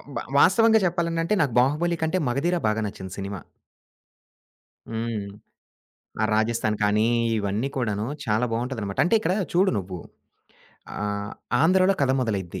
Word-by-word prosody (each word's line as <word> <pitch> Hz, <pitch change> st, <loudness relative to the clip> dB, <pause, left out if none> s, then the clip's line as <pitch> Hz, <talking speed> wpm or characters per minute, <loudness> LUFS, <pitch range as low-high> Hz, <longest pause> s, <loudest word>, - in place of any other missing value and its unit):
బ -, -, -2 dB, 0.2 s
వాస్తవంగా 225 Hz, -1 st, +5 dB
చెప్పాలనంటే 170 Hz, 0 st, 0 dB
నాకు 140 Hz, -6 st, 0 dB
'బాహుబలి' 155 Hz, +6 st, +1 dB
కంటే 160 Hz, +3 st, +1 dB
మగధీర 160 Hz, +8 st, 0 dB
బాగా 110 Hz, +1 st, 0 dB
నచ్చింది 95 Hz, -2 st, -8 dB
సినిమా. 100 Hz, -1 st, -5 dB, 1.5 s
హ్మ్. 115 Hz, -2 st, -3 dB, 1.0 s
ఆ -, -, +3 dB
రాజస్థాన్ 110 Hz, 0 st, 0 dB
కానీ, 105 Hz, +2 st, +3 dB, 0.3 s
ఇవన్నీ 105 Hz, +5 st, -1 dB
కూడాను 110 Hz, -4 st, -1 dB, 0.2 s
చాలా 110 Hz, 0 st, +1 dB
బావుంటాదన్నమాట. 115 Hz, -4 st, -3 dB
అంటే, 175 Hz, -, +2 dB
ఇక్కడ 195 Hz, -, 0 dB, 0.2 s
చూడు 190 Hz, +2 st, +4 dB
నువ్వు 90 Hz, -1 st, -6 dB, 1.0 s
ఆహ్, 105 Hz, 0 st, -3 dB, 0.3 s
ఆంధ్రలో 185 Hz, +4 st, +4 dB
కథ 135 Hz, -2 st, +3 dB
మొదలైద్ది. 95 Hz, -7 st, -3 dB
115 Hz, 125 wpm, -24 LUFS, 105-165 Hz, 1.5 s, వాస్తవంగా